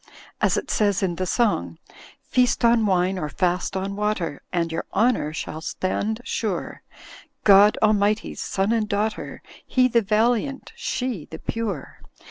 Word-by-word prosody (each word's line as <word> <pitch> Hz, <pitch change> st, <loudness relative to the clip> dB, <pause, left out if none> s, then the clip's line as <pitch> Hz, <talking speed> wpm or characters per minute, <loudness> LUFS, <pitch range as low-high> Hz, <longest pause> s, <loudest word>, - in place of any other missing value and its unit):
As -, -, +2 dB
it -, -, -3 dB
says 205 Hz, -3 st, +1 dB
in 175 Hz, -3 st, -1 dB
the 185 Hz, -, -2 dB
song: 170 Hz, -, 0 dB, 0.5 s
"Feast 250 Hz, -1 st, +2 dB
on 230 Hz, -2 st, +4 dB
wine 185 Hz, 0 st, +1 dB
or 150 Hz, -, -3 dB
fast 180 Hz, +4 st, -1 dB
on 195 Hz, +1 st, -3 dB
water. 205 Hz, -8 st, -2 dB
And 170 Hz, -2 st, -1 dB
your 165 Hz, -, -3 dB
honour 220 Hz, -7 st, +2 dB
shall 155 Hz, 0 st, -5 dB
stand 205 Hz, +7 st, -2 dB
sure; 215 Hz, -7 st, -3 dB, 0.6 s
God 205 Hz, +1 st, +7 dB
Almighty's 210 Hz, 0 st, +1 dB
son 195 Hz, +2 st, -1 dB
and 220 Hz, -2 st, 0 dB
daughter. 210 Hz, +2 st, -2 dB, 0.2 s
He 255 Hz, -1 st, +3 dB
the 235 Hz, -1 st, +3 dB
valiant, 230 Hz, +6 st, 0 dB
she 245 Hz, -, -3 dB
the 160 Hz, -, -7 dB
pure. 205 Hz, -7 st, -5 dB
205 Hz, 145 wpm, -23 LUFS, 180-225 Hz, 0.6 s, God